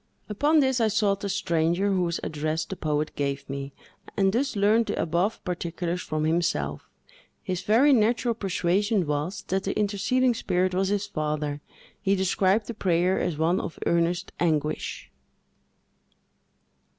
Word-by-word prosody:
Upon 295 +9 +3
this, 265 -3 +1
I 225 - +4
sought 205 -2 +1
the 200 - -4
stranger, 175 0 +1
whose 175 -3 0
address 155 +1 -2
the 190 - -6
poet 150 -3 -2
gave 140 -1 -2
me, 140 0 -5 0.5
and 195 -1 +3
thus 260 +2 0
learned 215 +3 +3
the - - -2
above 175 +6 0
particulars 175 0 -3
from 155 0 -2
himself. 165 +3 -1 0.5
His 185 -2 -3
very 255 +7 +4
natural 235 +1 +2
persuasion 195 0 0
was, 150 +5 -2
that 190 +1 0
the 195 - -2
interceding 220 +5 +1
spirit 185 -4 0
was 190 +1 +1
his 205 0 0
father. 150 -5 -3 0.4
He 195 -1 +2
described 190 +2 +2
the 235 - -5
prayer 180 -2 +1
as 160 - -1
one 165 +4 +2
of - - -6
earnest 170 +2 +1
anguish. 155 - -1
185 Hz, 145 wpm, -26 LUFS, 165-205 Hz, 0.5 s, I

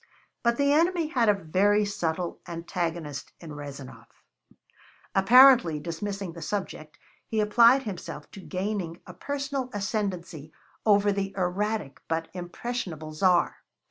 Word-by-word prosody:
But 235 0 +2
the 280 0 +3
enemy 335 0 +2
had 240 -7 +2
a - - +6
very 200 +4 +2
subtle 175 -3 -3
antagonist 170 -4 -4
in 165 -3 -10
Rezanov. 140 -2 -9 1.1
Apparently 235 - +7
dismissing 180 +3 -5
the 170 - -10
subject, 155 -4 -5 0.3
he 220 - -1
applied 235 +5 +5
himself 200 -7 -7
to - - -10
gaining 185 -2 -4
a 180 - -10
personal 275 +3 -3
ascendancy 185 -7 -3 0.4
over 205 -1 +5
the 195 -1 -3
erratic 185 -3 -2
but 165 0 -2
impressionable 175 -3 -5
Tsar. 180 +2 +2
195 Hz, 120 wpm, -27 LUFS, 165-220 Hz, 1.1 s, Apparently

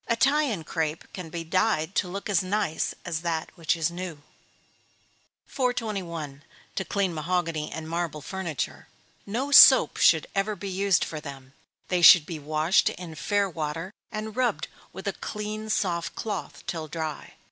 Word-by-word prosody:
Italian 260 - +2
crape 160 0 -3
can 180 -4 -7
be 165 +1 -5
dyed 185 0 +1
to 200 - +1
look 195 +3 -5
as 195 -5 +2
nice 190 -3 -1
as 165 -3 -2
that 165 -2 -2
which 165 -1 0
is 165 +1 0
new. 170 -4 -7 1.2
421. 190 - -3 0.3
To 190 - -2
clean 195 -2 -1
Mahogany 165 -1 -1
and 160 0 -6
Marble 165 -2 -3
Furniture. 180 -6 -4 0.4
No 250 +8 -2
soap 285 - +9
should - - +5
ever 200 +2 0
be 200 +1 -6
used 190 -1 +2
for 155 - -6
them 135 -3 -10 0.4
they 180 -1 +1
should 170 -2 +9
be 160 -1 -6
washed 155 +4 +2
in 175 -2 -8
fair 200 +4 0
water, 165 +2 -4 0.2
and 215 0 -5
rubbed 255 -1 0 0.2
with - - -8
a - - 0
clean, 215 +1 -5
soft 175 -5 -1
cloth, 205 -5 -5
till 160 -2 -4
dry. 155 -1 -5
175 Hz, 155 wpm, -26 LUFS, 160-205 Hz, 1.2 s, soap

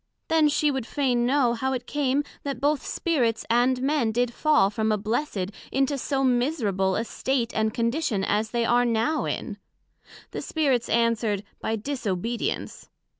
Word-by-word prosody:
Then 320 -2 +4
she 295 0 +2
would 265 -4 -3
fain 250 -4 +1
know, 260 -3 +3
how 265 +3 -1
it 250 -1 -3
came, 285 0 0 0.2
that 275 -3 -4
both 290 +2 +1
Spirits 250 - 0
and 250 +2 +2
Men 275 -5 +1
did 240 +1 0
fall 300 -10 +3
from 220 0 0
a 215 - +2
blessed 210 -2 -2 0.2
into 270 +1 +1
so 270 0 -1
miserable 240 - +1
a - - 0
state 245 -1 -1
and 220 0 +1
condition 230 -2 0
as 215 +2 0
they 235 0 0
are 240 +1 +3
now 235 +6 +1
in. - - -4 0.7
The - - -4
Spirits 270 -7 0
answered, 230 -3 +1 0.2
By 220 - -1
disobedience. 230 -2 -3
245 Hz, 160 wpm, -25 LUFS, 225-275 Hz, 0.7 s, Then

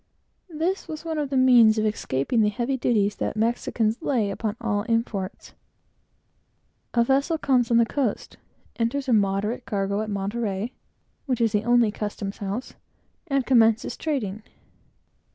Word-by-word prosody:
This 340 +5 -2
was 315 0 -7
one 320 -2 -2
of 290 -2 -2
the 270 - 0
means 240 -4 +6
of 215 - +1
escaping 210 - 0
the 210 - +3
heavy 240 +5 -2
duties 210 -5 +1
the - - -2
Mexicans 225 +1 0
lay 235 -10 0
upon 215 +1 -3
all 205 -3 -1
imports. 225 -4 -2 1.4
A 235 - +5
vessel 275 +6 +1
comes 255 -6 +2
on 235 - +4
the 235 - +5
coast, 250 -3 -2 0.4
enters 255 +4 -1
a 250 - +2
moderate 205 +3 0
cargo 200 0 -1
at 215 - -4
Monterey, 205 +2 -3 0.5
which 255 -3 0
is 230 -2 +2
the 210 +1 0
only 240 -2 +4
custom 205 -1 -4
house, 205 +5 -5 0.5
and 275 -3 0
commences 230 -3 +3
trading. 220 -10 -3
230 Hz, 150 wpm, -25 LUFS, 210-260 Hz, 1.4 s, means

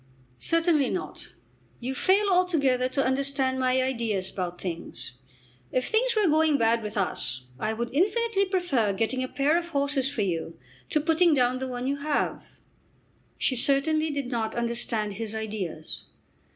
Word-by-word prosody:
"Certainly 330 -5 +2
not. 365 - -5 0.4
You 255 +2 -3
fail 390 +8 +3
altogether 280 -9 +2
to 275 +1 0
understand 265 0 0
my 255 0 +2
ideas 225 -7 -1
about 180 -2 -4
things. 170 -7 -6 0.6
If 255 - 0
things 470 +2 +2
were 425 -3 +3
going 310 -1 +3
bad 230 -1 +2
with 210 0 -6
us, 130 -9 -1
I 215 +1 -1
would 235 +2 -4
infinitely 400 +5 +2
prefer 350 - +1
getting 230 +6 0
a - - -2
pair 290 +5 +2
of 340 - -7
horses 280 -3 +1
for 245 -7 -1
you 165 -3 -3 0.3
to 305 - +2
putting 325 +1 +4
down 250 -1 +2
the 265 - -3
one 250 0 -4
you 280 +2 0
have." 290 +1 -2 0.8
She 260 - +1
certainly 305 +5 +2
did 280 -3 -3
not 225 -2 -2
understand 235 -3 0
his 220 +1 -4
ideas. 205 -8 -5
260 Hz, 155 wpm, -27 LUFS, 225-310 Hz, 0.8 s, putting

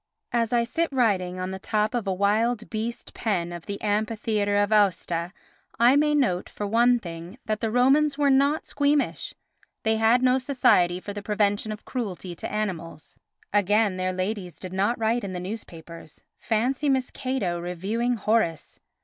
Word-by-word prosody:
As 230 -2 0
I 240 -1 +3
sit 330 +8 -1
writing 190 -8 +1
on 185 +1 -3
the 190 - -5
top 215 +3 0
of 235 -4 -2
a - - +1
wild 215 +4 +1
beast 230 +2 -4
pen 175 -6 -2
of 170 -1 -9
the 200 -1 -4
amphitheatre 210 -1 0
of 205 +1 +2
Aosta 180 -4 +1 0.5
I 240 +3 +5
may 300 +1 +3
note, 185 -11 +1
for 205 - -5
one 240 +4 +4
thing, 170 -1 -8
that 215 -1 -1
the 225 - 0
Romans 275 +5 +3
were 285 -1 +3
not 280 +3 +2
squeamish, 285 0 0 0.5
they 220 0 +2
had 225 +3 +3
no 255 +1 +4
Society 185 -10 +3
for 205 +2 -7
the 205 - -6
Prevention 205 +1 0
of 210 - -8
Cruelty 195 -7 -4
to - - -6
Animals. 175 -7 -4 0.4
Again, 205 0 +2
their 185 0 -1
ladies 185 -1 -3
did 185 -1 -8
not 200 +5 +1
write 230 +2 0
in 195 -2 -4
the 180 - -4
newspapers. 170 -5 -9 0.2
Fancy 250 +6 0
Miss 265 -2 +1
Cato 245 -10 -2
reviewing 200 +8 -1
Horace! 215 -7 -1
215 Hz, 170 wpm, -25 LUFS, 185-240 Hz, 0.5 s, I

